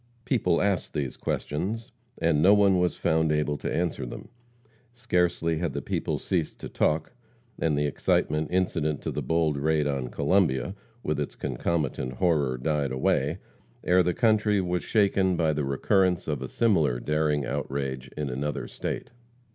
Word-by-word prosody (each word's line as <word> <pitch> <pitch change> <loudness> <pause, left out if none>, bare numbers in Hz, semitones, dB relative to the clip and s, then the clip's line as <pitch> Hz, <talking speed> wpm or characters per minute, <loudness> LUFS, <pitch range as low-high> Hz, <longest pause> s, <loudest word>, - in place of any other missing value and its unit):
People 90 -10 +2
asked 100 -3 -1
these 70 -4 -2
questions, 105 - -3 0.3
and 80 -3 +2
no 100 +5 +7
one 100 -2 +4
was 90 0 +1
found 80 0 +1
able 75 -1 +1
to - - -3
answer 85 -1 -1
them. - - -8 0.6
Scarcely 90 -8 0
had 85 -5 -2
the 70 - -3
people - - -1
ceased 85 -5 -2
to - - -6
talk, 80 +8 0 0.5
and 80 -3 +1
the 75 - +1
excitement 75 +1 +1
incident 80 -5 0
to - - -2
the - - -3
bold 80 -3 +1
raid 75 +1 +1
on 70 -3 -1
Columbia, 85 +3 +1 0.3
with 75 -1 -1
its 75 - -3
concomitant 65 -1 -2
horror, 75 -5 +1
died 70 +1 -1
away, 65 +4 +1 0.5
ere 90 +1 +4
the 90 -1 0
country 110 -2 +3
was 90 -1 -1
shaken 100 -4 +2
by 80 -2 +2
the 75 0 -1
recurrence 90 +7 +1
of 75 -4 -2
a 65 - -5
similar 80 - +2
daring 75 0 0
outrage 65 -2 -3
in 75 -1 -2
another 70 +4 -3
state. - - -5
80 Hz, 160 wpm, -27 LUFS, 70-90 Hz, 0.6 s, no